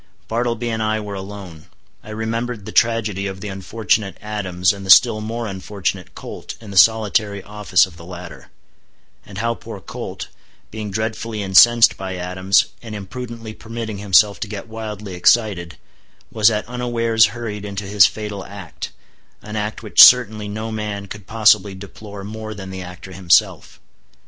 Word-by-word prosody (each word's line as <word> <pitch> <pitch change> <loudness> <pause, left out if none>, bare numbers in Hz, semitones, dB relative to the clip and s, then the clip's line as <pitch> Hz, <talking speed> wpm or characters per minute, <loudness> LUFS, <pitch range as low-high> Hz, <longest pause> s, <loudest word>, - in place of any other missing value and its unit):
Bartleby 120 +1 -1
and 110 0 -2
I 110 0 0
were 105 -1 -6
alone. 95 -4 -9 0.4
I - - -12
remembered 110 0 -4
the - - -7
tragedy 110 -4 +1
of 95 0 -6
the 105 - -6
unfortunate 100 +1 -1
Adams 95 -4 -1
and 100 -1 -9
the 95 - -8
still 110 +2 +7
more 115 +2 -4
unfortunate 95 -2 -4
Colt - - -8
in 110 -3 -11
the - - -8
solitary 105 0 +3
office 105 -2 +2
of 90 -3 -15
the 85 - -12
latter; 85 -6 -10 0.8
and 100 - -10
how 115 +2 0
poor - - -9
Colt, - - -7 0.4
being 110 -1 -5
dreadfully 110 +1 -3
incensed 115 +4 +6
by 95 -1 -5
Adams, 95 +2 +2 0.2
and 110 -2 -8
imprudently 115 +2 -7
permitting 115 -2 -6
himself 100 +1 +4
to 110 - -4
get 100 +1 -7
wildly 105 -3 -7
excited, 90 -2 +2 0.5
was 110 0 +4
at 105 -1 -2
unawares 115 -2 +2
hurried 105 -4 -5
into 100 0 -5
his 100 0 +5
fatal 105 -2 -6
act—an 100 +3 -11
act 105 +2 -3
which 105 - +5
certainly 110 -4 +7
no 110 +2 -5
man 105 -2 -4
could 100 -1 -10
possibly 105 -3 +3
deplore 100 +1 -10
more 110 +1 -7
than 95 -1 -8
the 95 0 -6
actor 90 +1 -10
himself. 95 -1 +1
105 Hz, 160 wpm, -20 LUFS, 95-110 Hz, 0.8 s, still